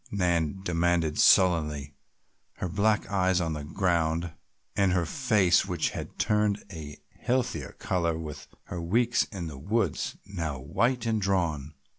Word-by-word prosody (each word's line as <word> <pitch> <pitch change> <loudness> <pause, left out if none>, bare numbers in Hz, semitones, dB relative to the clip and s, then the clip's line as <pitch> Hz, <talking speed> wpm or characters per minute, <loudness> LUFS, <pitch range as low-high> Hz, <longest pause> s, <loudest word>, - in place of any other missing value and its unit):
Nan 90 -2 0
demanded 85 -3 +1
sullenly, 75 -6 +4 0.6
her 90 - -4
black 105 +5 +1
eyes 95 -2 +2
on 80 -2 -1
the 75 -1 -5
ground 85 0 0 0.4
and 95 -2 +3
her 90 -2 +1
face, 100 - +2
which 90 -4 -1
had - - -7
turned 105 -1 +1
a 75 -4 -8 0.2
healthier 125 0 -1
color 85 -3 0
with 75 -2 -7 0.2
her 90 - -6
weeks 115 +7 +2
in 95 -5 -6
the 75 -4 -7
woods, 100 +1 -1
now 85 -7 -4
white 115 - 0
and 110 -2 0
drawn. 80 -7 -1
90 Hz, 140 wpm, -28 LUFS, 80-100 Hz, 0.6 s, sullenly